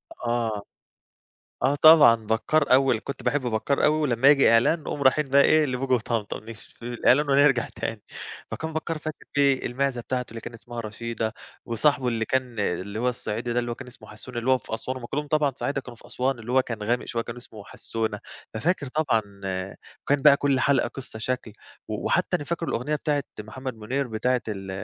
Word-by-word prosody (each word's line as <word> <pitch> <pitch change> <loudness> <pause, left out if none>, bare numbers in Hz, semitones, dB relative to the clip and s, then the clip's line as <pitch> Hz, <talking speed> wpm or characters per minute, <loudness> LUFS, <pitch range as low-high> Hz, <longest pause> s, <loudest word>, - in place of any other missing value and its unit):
آه، 115 -3 -2 1.0
آه، 135 +2 +3
طبعًا، 150 -5 +8
بكّار 130 +7 +1
أول 130 -3 +4
كنت 140 - -6
باحب 145 - +1
بكّار 125 +3 0
أوي 155 +1 +4
ولمّا 130 -2 +3
ييجي 140 -4 +6
إعلان 120 +8 +4
نقوم 145 -1 -4
رايحين 135 +2 +3
بقى 140 +1 +6
إيه، 155 -1 +5
لبوجي 130 0 0
وطمطم 115 -2 -2
نشوف 115 -1 -11
في - - -24
الإعلان 125 +4 +2
ونرجَع 135 -3 +4
تاني، 115 -2 -4 0.5
فكان 160 0 -4
بكّار 160 0 -3
فاكر 155 0 -7
فيه 140 -2 +3
المعزة 130 0 -1
بتاعته 125 0 -3
اللي 115 0 -7
كان 115 - -9
إسمها 120 +1 -7
رشيدة 110 0 -4 0.3
وصاحبه 125 +2 +1
اللي 115 -1 0
كان 125 -2 -2
آآ، 90 -3 +1
اللي 100 +4 -6
هو 125 +2 +1
الصعيدي 120 0 -3
ده 120 - 0
اللي 120 0 -4
هو - - -2
كان 135 - -10
إسمه 110 -3 -12
حسّونة، 120 +3 -7
اللي 120 +3 0
هو 130 - +5
في 110 - -6
أسوان 130 +3 -4
هُم 120 -2 -7
كُلّهم 150 +3 -3
طبعًا 145 -2 +1
صعايدة 140 -1 -2
كانوا 120 -3 -11
في - - -17
أسوان 130 0 -1
اللي 115 +3 -6
هو 130 0 +5
كان 115 -4 -6
غامق 120 +3 0
شوية 115 -1 -2
كان 115 - -8
إسمه 110 -4 -10
حسّونة، 110 -1 -3 0.4
ففاكر 145 +3 0
طبعًا 130 -6 +1 0.8
وكان 140 -1 +1
بقى 145 -2 +8
كلّ 140 -2 +1
حلقة 135 -4 +2
قَصّة 130 -4 -8
شكل 125 -1 -3 0.4
و - - -4
وحتى - - +2
أنا 145 - -7
فاكر 170 +1 -3
الأُغنية 145 +6 -1
بتاعة 145 -1 0 0.2
محمد 125 +4 -6
منير 130 +6 -2
بتاعة 125 +3 0
ال 95 -2 -5
125 Hz, 200 wpm, -25 LUFS, 115-140 Hz, 1.0 s, طبعًا